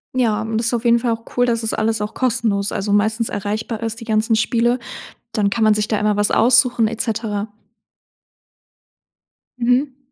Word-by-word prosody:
Ja, 225 -4 +1
und 220 0 -3
das 230 - 0
ist 240 - 0
auf 235 0 -1
jeden 235 0 +4
Fall 235 -1 -1
auch 225 0 -4
cool, 245 - +4
dass 230 -1 -1
es 225 - 0
alles 220 0 0
auch 210 +1 -4
kostenlos, 225 -5 0
also, 200 +1 -2
meistens 220 +3 +1
erreichbar 215 +2 -4
ist, 230 +1 -4
die - - -6
ganzen 220 0 +1
Spiele. 235 +2 +1 0.6
Dann 205 -3 +1
kann 225 +2 -1
man 215 - +5
sich 210 0 -1
da 215 - 0
immer 210 0 +1
was 205 0 +1
aussuchen 240 -1 +4
et 230 0 -3
cetera. 220 -2 -3 2.1
Mhm. 255 +3 +1
225 Hz, 190 wpm, -19 LUFS, 210-235 Hz, 2.1 s, man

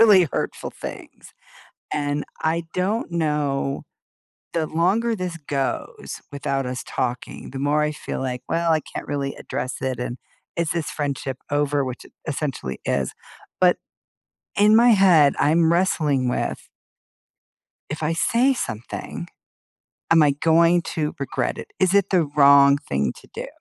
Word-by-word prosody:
really 200 -7 +7
hurtful - - -3
things, - - -10 0.6
and 145 0 -1 0.2
I 165 +1 0
don't 195 +3 -1
know 150 -4 0 0.7
the 165 -2 0
longer 195 +9 +1
this 180 -3 -4
goes 140 -3 -3
without 140 -2 -2
us 125 0 -4
talking, 125 0 -4
the 135 - -6
more 145 +2 +2
I 150 - +1
feel 150 - -5
like, 125 -2 -3
"Well, 165 0 +1
I 160 -1 +3
can't - - -8
really 140 -1 -2
address 130 - -4
it," 130 -2 -2
and, 125 0 -4 0.4
"is 170 -2 0
this 170 -2 -2
friendship 140 -3 -3
over," 145 -1 +1
which 130 -1 -6
it - - -17
essentially 135 - -3
is, - - -1 0.5
but - - +5 0.8
in 210 +2 +6
my 235 +2 +7
head, 180 -9 +6
I'm 160 +2 +3
wrestling 155 -7 +2
with 125 - -2 1.2
"If 150 +2 -5
I 155 +2 +1
say 235 - +3
something, 115 - -5 0.8
am 165 -1 +7
I 145 -1 +5
going 165 +4 +4
to 150 -2 -1
regret 140 - -2
it? - - -7
Is 185 0 +3
it 200 -1 +3
the 180 -4 +4
wrong 140 -1 +7
thing 70 - -1
to - - -19
do? - - -5
150 Hz, 145 wpm, -23 LUFS, 140-170 Hz, 1.2 s, really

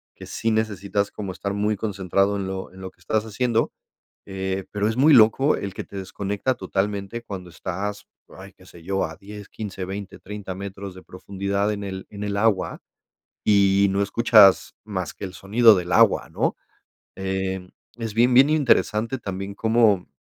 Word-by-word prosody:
que - - -11
sí 115 - -1
necesitas 100 -2 -1
como 100 -3 -5
estar 100 +2 -4
muy 105 +1 0
concentrado 100 -1 0
en 100 -1 -3
lo 95 -1 -5
en 95 - -12
lo 95 0 -7
que - - -37
estás 110 +5 -1
haciendo, 115 +1 0 0.5
eh, 95 -1 -3
pero 105 0 -1
es 110 - -2
muy 150 +4 +5
loco 130 +4 +5
el 100 -1 -5
que - - -6
te 100 - -12
desconecta 100 +6 -2
totalmente 100 +1 -3
cuando 95 -5 -8
estás, 100 +4 -5 0.2
ay, - - -12
qué - - -20
sé 85 - -15
yo, 95 +1 0
a 80 - -6
10, 105 0 -11
15, 95 -3 -6
20, 100 +1 -7
30 100 -2 -7
metros 100 0 -7
de 95 - -12
profundidad 100 +2 -2
en 100 0 -5
el 95 -1 -6
en 100 0 -9
el 100 0 -2
agua 105 -3 +1 0.6
y 100 -1 +4
no 100 +1 0
escuchas 105 -2 +5
más 95 -4 -4
que 100 - -6
el 90 - -8
sonido 110 +3 +5
del 90 -1 -3
agua, - - +4
¿no?, - - -1 0.6
em, 95 -1 -3 0.3
es 115 -3 -4
bien 120 +2 +4
bien 135 +4 +7
interesante 130 -5 +2
también 100 -1 -5
cómo 110 -4 +3
100 Hz, 180 wpm, -23 LUFS, 95-110 Hz, 0.6 s, bien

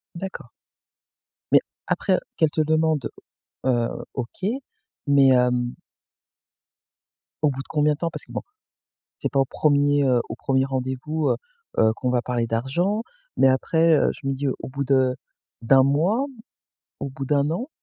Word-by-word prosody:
D'accord. 190 +2 -7 1.0
Mais, - - +8 0.3
après, 190 - +1
heu, - - 0 0.2
qu'elle 160 -3 +3
te 155 - +1
demande, 155 -2 +1 0.6
heu, 120 -2 +2 0.3
OK, 130 +9 -5 0.6
mais 140 -1 +5
hem 125 -1 +2 1.7
au 150 - +5
bout 135 0 -5
de - - -13
combien 150 -1 +2
de - - -6
temps 170 - -1
parce 150 -3 -7
que, - - -15
bon, - - -3 0.8
c'est - - -1
pas 135 - +1
au - - +4
1er, 145 0 +2
heu, 125 -2 +3
au - - -4
1er 130 +1 +1
rendez-vous, 135 +4 -2
heu - - +2 0.4
heu, 110 0 +5
qu'on 125 - -1
va 125 -1 +2
parler 120 -2 -1
d'argent, 170 - 0 0.3
mais, 135 - +5
après, 160 +5 +3
heu, - - +3
je 135 - -9
me 135 - 0
dis 140 +1 -2
au 130 - -4
bout 140 +1 -3
de 130 -1 +3 0.5
d'1 130 +3 +6
mois, 180 - +2 0.7
au 140 - -4
bout 135 +1 -6
d'1 145 +1 +2
an? 240 - -3
140 Hz, 165 wpm, -24 LUFS, 130-155 Hz, 1.7 s, Mais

